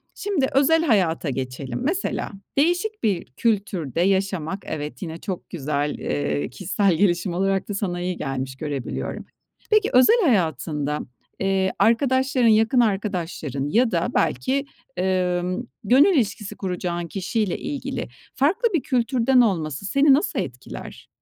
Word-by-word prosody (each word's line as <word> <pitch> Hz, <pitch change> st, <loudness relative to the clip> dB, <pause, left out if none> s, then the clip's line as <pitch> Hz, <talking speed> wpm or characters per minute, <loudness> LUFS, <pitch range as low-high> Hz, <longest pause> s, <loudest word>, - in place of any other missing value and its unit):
şimdi 380 Hz, -10 st, 0 dB
özel 320 Hz, +4 st, +4 dB
hayata 185 Hz, -, +2 dB
geçelim. 130 Hz, -1 st, -4 dB
Mesela 350 Hz, +7 st, -1 dB, 0.3 s
değişik 350 Hz, +8 st, +1 dB
bir 195 Hz, -6 st, +1 dB
kültürde 185 Hz, -, -1 dB
yaşamak, 190 Hz, -2 st, 0 dB
evet, 150 Hz, -1 st, -5 dB
yine 165 Hz, -3 st, -5 dB
çok 185 Hz, +1 st, -6 dB
güzel, 145 Hz, -2 st, -2 dB
eee, 75 Hz, 0 st, -2 dB
kişisel 190 Hz, -, 0 dB
gelişim 175 Hz, 0 st, +1 dB
olarak 195 Hz, +2 st, 0 dB
da -, -, -2 dB
sana 180 Hz, -3 st, -2 dB
iyi 180 Hz, 0 st, -2 dB
gelmiş, 135 Hz, -1 st, -4 dB
görebiliyorum. 145 Hz, -3 st, -4 dB, 0.5 s
Peki, 430 Hz, 0 st, +4 dB
özel 440 Hz, -, +6 dB
hayatında, 150 Hz, -, 0 dB, 0.4 s
eee, 190 Hz, -1 st, +1 dB
arkadaşların, 260 Hz, +1 st, +3 dB
yakın 225 Hz, +3 st, +4 dB
arkadaşların 180 Hz, -, -1 dB
ya 230 Hz, +6 st, +3 dB
da -, -, +1 dB
belki, 275 Hz, +1 st, +1 dB, 0.3 s
emm, 180 Hz, +1 st, 0 dB, 0.2 s
gönül 275 Hz, -, +5 dB
ilişkisi 215 Hz, -5 st, -1 dB
kuracağın 175 Hz, -2 st, -3 dB
kişiyle 200 Hz, +2 st, -1 dB
ilgili 290 Hz, -1 st, -4 dB, 0.3 s
farklı 370 Hz, -, +2 dB
bir 330 Hz, -, +2 dB
kültürden 250 Hz, 0 st, +3 dB
olması 165 Hz, -, 0 dB
seni 275 Hz, +7 st, +4 dB
nasıl 280 Hz, -5 st, +1 dB
etkiler? 130 Hz, -9 st, -7 dB
195 Hz, 125 wpm, -23 LUFS, 160-255 Hz, 0.5 s, özel